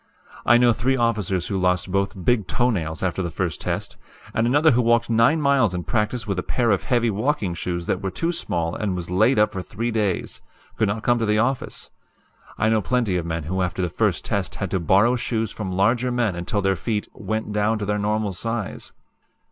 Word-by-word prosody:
I 120 - +7
know 120 -1 +5
three 130 +3 0
officers 105 -7 0
who 95 - -2
lost 90 0 +1
both 100 -1 -1
big 115 -6 +2
toe 120 +5 +1
nails 80 -6 -3
after 95 0 -1
the 85 - -2
first 85 -1 -3
test, - - -3 0.4
and 115 +1 +1
another 145 +5 +4
who 125 0 +3
walked 115 0 +2
nine 115 +8 +4
miles 140 - +2
in 90 - -3
practice 110 +2 -1
with 100 -4 -2
a - - 0
pair 120 +4 0
of 100 - 0
heavy 120 -3 +2
walking 105 -3 -1
shoes 85 0 -3
that 90 - -1
were 95 - -2
too 165 - -1
small 85 - -2
and 100 -4 -2
was 90 -1 -5
laid 110 +8 +3
up 105 0 +4
for 95 - -3
three 115 +6 -3
days 105 -5 -2 0.3
could 110 - +1
not 105 +2 -2
come 120 0 +2
to 115 - 0
the 105 0 +2
office. 125 +4 -2 0.7
I 110 - +1
know 110 -1 +3
plenty 120 -5 0
of 85 -2 -2
men 80 -1 -3
who 95 +5 -2
after 90 0 -1
the 90 - 0
first - - 0
test - - -2
had - - -4
to 95 - +1
borrow 100 +8 +4
shoes 115 -2 -2
from 95 -4 -5
larger 115 +7 +1
men 120 -5 +1
until 90 +4 -2
their 95 0 +2
feet 105 +5 -2
'went 110 -1 -4
down' 105 +2 +1
to 105 - -3
their 105 +1 -1
normal 105 -1 -1
size. 115 +2 -4
105 Hz, 220 wpm, -23 LUFS, 95-120 Hz, 0.7 s, I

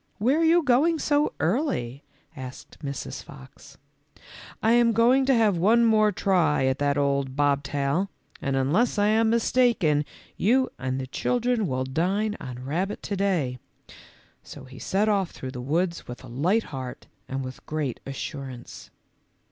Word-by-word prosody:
"Where 255 +9 +2
are - - +2
you 335 +1 +4
going 290 +5 +3
so 295 -1 +1
early?" 145 - -1 0.3
asked 130 -2 -10
Mrs. 140 -1 -5
Fox. 65 0 -14
M - - -31 0.4
I 225 - +4
am 235 -1 +4
going 245 +4 +4
to 270 - +4
have 215 -5 +3
one 225 +7 +4
more 215 -2 +4
try 180 -8 +2
at 130 +1 0
that 145 0 +1
old 140 -2 0
bobtai], 145 +4 0 0.3
and 135 -1 -1
unless 155 - +1
I 205 0 +3
am 220 +1 +3
mistaken 230 -10 +2 0.3
you 255 +6 +2
and 130 0 -2
the 130 - -3
children 240 - 0
will 130 -2 -1
dine 190 +10 0
on 125 -1 -8
rabbit 180 +9 -2
to 200 - -3
day; 170 -11 0 0.4
" - - -22 0.3
so 145 - -11
he 130 0 -12
set 200 +3 0
off 200 -4 +1
through 130 - -7
the 125 -2 -6
woods 170 +6 -1
with 125 +1 -8
a - - -10
light 170 - +1
heart 130 -2 -6 0.2
and 135 0 -3
with 130 0 -9
great 150 -5 -3
assurance. 135 -2 -7
170 Hz, 165 wpm, -25 LUFS, 135-225 Hz, 0.4 s, you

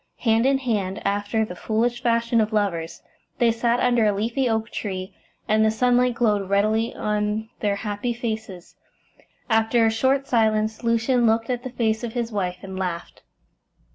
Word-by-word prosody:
Hand 225 +1 +3
in 275 0 +3
hand, 210 -7 -2
after 205 +2 0
the 180 - -8
foolish 235 +5 -1
fashion 230 -1 +2
of 215 +1 -1
lovers, 185 -6 -2 0.3
they 235 -1 +3
sat 235 +1 +1
under 245 -2 +3
a - - +4
leafy 235 +6 -1
oak 220 0 -1
tree, 190 -2 -5 0.3
and 220 0 +3
the 220 - +4
sunlight 245 +2 +2
glowed 210 -5 +1
redly 215 +3 +2
on 210 +1 -1
their 205 -2 0
happy 205 +4 -3
faces. 220 -6 -5 0.7
After 225 0 +3
a 225 - +3
short 265 +4 +1
silence 220 -2 +1
Lucian 235 +1 +2
looked 225 +2 +1
at 245 -1 -2
the 255 - -6
face 225 -2 -1
of 230 -2 -4
his 240 -2 -2
wife 180 -4 -2
and 190 -1 -6
laughed. 175 -2 -4
220 Hz, 170 wpm, -23 LUFS, 210-235 Hz, 0.7 s, a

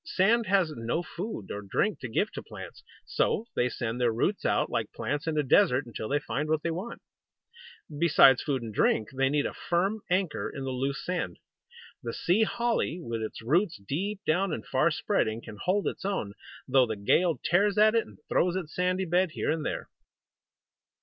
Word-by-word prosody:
Sand 230 - +2
has 185 -5 +2
no 115 +9 -2
food 175 - -6
or 105 - -4
drink 190 - 0
to 130 - -6
give 205 - 0
to - - -6
plants. - - -10 0.2
So 220 - 0
they 125 - +2
send 120 0 -3
their 120 -1 +3
roots 175 - -1
out, - - +2
like - - -1
plants 145 +3 -3
in 160 -1 0
a 150 - +3
desert, 130 0 +4
until 110 -2 -6
they 145 - +2
find 150 +1 -3
what 155 -1 +1
they 170 - 0
want. 190 +8 -6 1.0
Besides 140 -6 +6
food 135 -5 -1
and 110 -2 -6
drink, 110 +1 +2
they 135 0 +2
need 145 0 +1
a - - -3
firm 195 +5 -1
anchor 180 -3 0
in 135 - -6
the 135 - -3
loose 135 +1 -2
sand. 180 0 -2 0.6
The - - -4
Sea 180 +6 +2
Holly, 230 -5 0
with 115 -8 -4
its 110 0 -6
roots 170 - +2
deep 185 - -3
down 180 +4 +1
and 115 -8 -4
far - - +2
spreading, 110 +1 0
can 110 -2 -10
hold 195 +3 +1
its - - -4
own, 190 - -2 0.3
though 130 -1 +4
the 110 - -2
gale 165 - +2
tears 200 +4 +2
at 215 +1 +6
it 230 -1 +1
and - - -15
throws 180 0 +2
its 175 -5 -4
sandy 180 +1 0
bed 180 0 +1
here - - -1
and 160 -1 -1
there. - - -3
160 Hz, 195 wpm, -28 LUFS, 125-190 Hz, 1.0 s, Besides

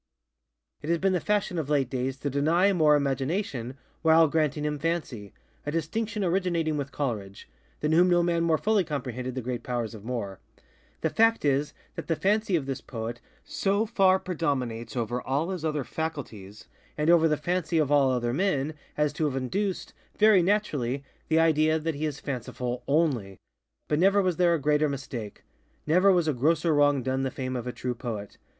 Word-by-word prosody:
It 150 - -6
has 170 - +3
been 190 +2 +1
the 180 - +1
fashion 205 -2 0
of 150 -3 -4
late 140 -3 +2
days 130 0 -2
to 145 - -1
deny 165 +8 +3
Moore 155 -4 +4
Imagination, 135 - -2 0.2
while 160 0 +5
granting 150 -1 0
him 150 -1 -2
FancyŌĆöa 140 -10 -3 0.4
distinction 205 +8 -2
originating 170 -3 0
with 140 -1 -4
ColeridgeŌĆöthan 105 -9 -4 0.5
whom 175 +3 +5
no 175 -1 +4
man 170 -1 +1
more 165 -1 +3
fully 210 0 +2
comprehended 130 -5 -4
the 130 - -4
great 120 0 -3
powers 120 -2 -3
of 105 -3 -10
Moore. 110 -5 -4 0.6
The - - 0
fact 225 -5 +3
is, 145 +1 +1 0.2
that - - -7
the 165 - +1
fancy 205 +2 +1
of 150 -5 0
this 135 -1 -4
poet 115 0 -6 0.2
so 200 +2 0
far 195 -4 +4
predominates 135 -11 -3
over 120 +1 -2
all 145 +8 -1
his 180 -4 -5
other 150 -3 -1
faculties, 115 -11 -6 0.3
and 150 +2 +3
over 165 -1 +5
the 150 -1 +1
fancy 170 +1 -1
of 150 -3 +1
all 140 -2 +4
other 120 -2 0
men, 155 -3 0 0.2
as 150 -1 +1
to 155 - -1
have 140 -3 -1
induced, 185 +10 -2 0.2
very 210 -3 +6
naturally, 150 - 0 0.2
the 160 - +2
idea 155 -1 +3
that 160 +1 -2
he 150 +2 -2
is 145 -2 -5
fanciful 125 -2 -4
_only. 135 - +1 0.5
_But 150 - +1
never 195 +3 +4
was 180 -3 0
there 175 -2 +4
a - - -2
greater 150 +1 +2
mistake. 125 -6 -6 0.4
Never 180 +6 +4
was 175 -3 +2
a 155 - +2
grosser 160 +5 +2
wrong 145 -2 +3
done 130 +1 -1
the 135 - 0
fame 130 0 -4
of 125 -1 -4
a - - -2
true 125 0 -3
poet. 110 -4 -6
150 Hz, 185 wpm, -27 LUFS, 130-170 Hz, 0.6 s, very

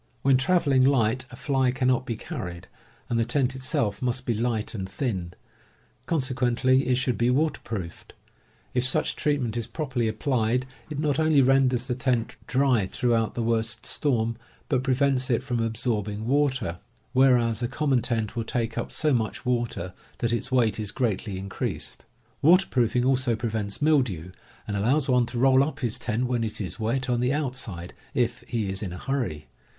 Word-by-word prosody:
When 135 -1 +5
traveling 135 -1 +3
light, 130 -2 +2
a - - -10
fly 135 -1 +1
cannot 130 0 +1
be 115 - -2
carried, 95 - -6 0.4
and 115 - 0
the - - +3
tent 130 +2 0
itself 130 -6 -1
must 125 0 -1
be 120 - +1
light 115 -1 -1
and 95 -4 -4
thin; 95 -6 -3 0.7
consequently 130 -3 +1
it 130 - +3
should 125 -3 -1
be 120 +1 +3
waterproofed. 120 - -2 0.6
If 125 - +1
such 130 - +2
treatment 140 -7 0
is 115 - -2
properly 130 -7 -2
applied 120 +2 0 0.2
it 150 - -5
not 150 0 0
only 155 -3 +4
renders 130 -2 +3
the 125 - -1
tent 120 -2 -1
dry 125 -6 +2
throughout 115 0 0
the 120 - -1
worst 115 0 -1
storm, 115 -6 0 0.3
but 130 -5 +2
prevents 130 0 +1
it 120 0 +1
from 125 -3 -2
absorbing 110 -2 -1
water, 130 -9 +1 0.3
whereas 125 -3 +4
a 120 - 0
common 135 0 +1
tent 115 -1 -2
will 115 - -1
take 115 0 -2
up - - -4
so 150 -2 +1
much 115 +1 -1
water 120 -7 -1 0.2
that 120 -1 0
its 120 +3 -2
weight 120 -4 +2
is 105 -2 0
greatly 105 -5 -1
increased. 95 +1 -4 0.4
Waterproofing 130 - +4
also 130 -2 +2
prevents 110 0 -3
mildew, 120 - +1 0.4
and 105 - -2
allows 130 +8 +2
one 125 -2 +3
to 120 - -5
roll 130 +2 +5
up 150 +1 -4
his 120 -3 -1
tent 120 +2 -1
when 120 -2 0
it 110 - -3
is 100 +1 -4
wet 120 +4 0
on 120 -1 +1
the 125 +1 +1
outside, 125 - -3 0.2
if 120 -1 0
he 115 -4 -1
is 95 0 -2
in 100 -4 -4
a - - -6
hurry. 120 - -3
125 Hz, 175 wpm, -26 LUFS, 110-130 Hz, 0.7 s, When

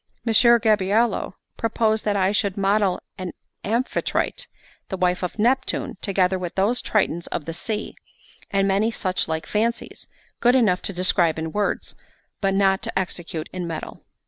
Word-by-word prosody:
Messer 235 +1 +6
Gabriello 215 -1 +2 0.2
proposed 220 -1 +1
that 205 -1 +1
I 190 -1 +2
should 205 -2 0
model 195 -1 +2 0.2
an 185 -2 -5 0.3
Amphitrite, 235 +5 -1 0.4
the 190 - -3
wife 180 +1 +1
of 180 +2 -4
Neptune, 255 +5 +1
together 190 -1 +1
with 175 -2 -5
those 210 +6 +2
Tritons 175 -5 0
of 150 - -4
the 165 - -4
sea, 215 +5 -4 0.6
and 195 0 +2
many 200 +3 +2
such 185 -5 -1
like 160 0 -2
fancies, 230 +2 -2 0.3
good 245 +1 +4
enough 205 -8 +3
to - - -1
describe 175 -3 +2
in 160 0 -3
words, 205 +2 -1 0.5
but 195 -1 +1
not 195 -1 +3
to - - -3
execute 175 -4 -3
in 180 -2 -4
metal. 165 -1 -6
195 Hz, 155 wpm, -23 LUFS, 180-220 Hz, 0.6 s, Messer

